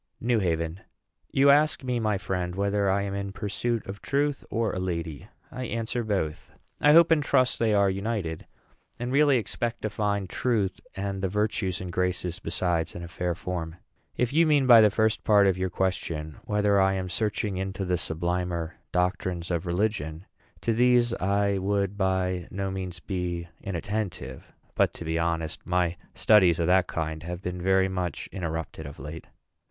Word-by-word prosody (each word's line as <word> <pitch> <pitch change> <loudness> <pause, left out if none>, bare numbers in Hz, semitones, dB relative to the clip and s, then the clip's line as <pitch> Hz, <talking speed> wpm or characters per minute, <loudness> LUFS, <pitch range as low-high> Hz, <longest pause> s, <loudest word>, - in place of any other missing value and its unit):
NEW 120 -1 +2
HAVEN. 85 -2 -1 0.5
You 140 +1 +6
ask 150 0 +3
me, 125 -2 -1
my 110 -3 +1
friend, 90 -2 -3
whether 100 0 +1
I 100 +1 +2
am 100 -1 -3
in 100 0 -3
pursuit 105 +3 -2
of 100 +1 -7
truth, 145 0 0
or 115 -1 0
a - - -2
lady. 85 -2 -4 0.2
I 130 -1 -5
answer, 115 +1 -2
Both. 95 -8 -2 0.3
I 150 0 +6
hope 170 +1 +7
and 160 -2 +5
trust 130 -3 +2
they 110 -2 +3
are 100 -1 +4
united, 95 -4 -2 0.5
and 120 +1 -3
really 140 -1 +5
expect 120 +1 -3
to 110 - -1
find 100 -2 -1
Truth, 105 -2 0 0.2
and 95 0 -3
the 95 - +1
Virtues 105 -2 -1
and 90 -1 -5
Graces 90 0 -1
besides, 85 -4 -1
in 85 - -6
a - - -6
fair 90 0 -2
form. 85 -2 -4 0.4
If 125 +1 0
you 165 +2 +5
mean 145 -3 +4
by 120 -3 +9
the 105 - +6
first 110 +1 +1
part 105 -2 +5
of 95 -2 +3
your 95 0 -1
question 85 -5 -2
whether 105 -1 +3
I 95 0 +3
am 95 -1 -2
searching 105 0 -1
into 95 0 -3
the 90 -1 0
sublimer 85 0 -2
doctrines 90 -1 -1
of 85 +1 -1
religion, 90 -3 -1 0.4
to 115 - +1
these 120 0 +4
I 100 0 +1
would 100 0 0
by 95 -2 0
no 95 0 -3
means 95 -2 -5
be 90 -2 -3
inattentive; 100 +1 -4 0.2
but, - - +2
to 85 - -7
be 80 +1 -1
honest, 85 -1 -2
my 90 -1 +1 0.2
studies 95 -6 +5
of 85 - +2
that 90 +1 +4
kind 80 -1 -3
have 90 +2 -6
been 90 0 -4
very 95 +1 +3
much 90 -2 -3
interrupted 80 -3 -4
of 70 - -10
late. 75 +4 -8
95 Hz, 180 wpm, -27 LUFS, 90-110 Hz, 0.5 s, by